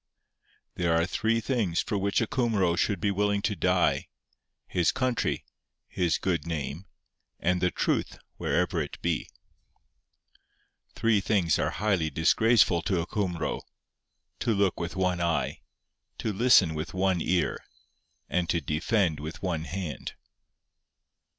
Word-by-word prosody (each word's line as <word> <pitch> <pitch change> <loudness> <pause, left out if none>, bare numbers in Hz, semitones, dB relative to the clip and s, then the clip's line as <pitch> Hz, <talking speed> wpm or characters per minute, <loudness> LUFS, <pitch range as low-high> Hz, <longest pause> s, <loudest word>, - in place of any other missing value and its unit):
'There 85 -2 +2
are 85 - +2
three 110 +4 0
things 110 -8 0
for - - -1
which 100 +2 +1
a - - +2
Cumro 110 -8 +1
should 100 +3 0
be 100 - +1
willing 100 0 0
to - - 0
die: - - +1 0.6
his 85 -2 +1
country, 130 -2 -1 0.4
his 90 -2 0
good 85 -3 -1
name, 80 +2 -4 0.5
and 90 0 +1
the 90 - +3
truth - - -1 0.2
wherever 90 -1 0
it 70 - -6
be. 85 -2 -1 1.7
'Three 110 -3 +2
things 95 -7 +2
are - - +1
highly 95 -7 0
disgraceful 95 +2 +3
to 90 0 0
a - - -3
Cumro: 90 -4 -2 0.8
to 115 -3 +1
look 100 -2 +1
with 85 +1 -4
one 90 -2 0
eye, 85 -4 -1 0.6
to 110 - -2
listen 100 -6 +5
with 75 +3 -5
one 95 -2 +1
ear, 90 +1 0 0.6
and 90 -1 -1
to 85 - +2
defend 80 - 0
with 80 +5 -7
one 85 -4 -1
hand. 85 -6 -5
90 Hz, 135 wpm, -28 LUFS, 85-105 Hz, 1.7 s, listen